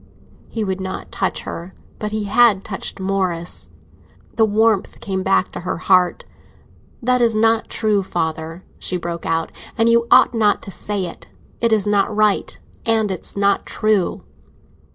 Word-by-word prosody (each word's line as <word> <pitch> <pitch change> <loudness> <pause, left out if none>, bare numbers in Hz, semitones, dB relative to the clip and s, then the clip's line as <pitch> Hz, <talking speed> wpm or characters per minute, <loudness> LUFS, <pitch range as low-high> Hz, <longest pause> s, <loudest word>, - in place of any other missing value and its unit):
He 225 - -3
would 190 -1 -2
not 190 0 -6
touch - - -1
her, 175 +3 -7 0.2
but 210 0 -3
he 215 0 -2
had 205 -1 +4
touched 195 -2 -4
Morris. 185 -3 -2 0.7
The 225 - +4
warmth 215 -1 +1
came 190 -2 -3
back 190 0 +2
to - - -6
her 175 - -3
heart. 180 0 +2 0.8
"That 250 +1 +2
is 230 -2 +3
not 225 +1 +2
true, 215 -3 +1
father," 165 -1 -3 0.2
she 180 - -1
broke 170 -1 -5
out, 165 0 0 0.3
"and 225 - +3
you 235 0 +3
ought - - +6
not 215 -3 +2
to 195 - -6
say 200 0 -2
it! 170 - -9 0.3
It 230 -1 +1
is 215 -3 +3
not 205 -1 +2
right, 215 -1 +2 0.3
and 220 -3 +1
it's 185 +1 -6
not 200 0 +2
true!" 215 -4 0
200 Hz, 160 wpm, -20 LUFS, 185-220 Hz, 0.8 s, ought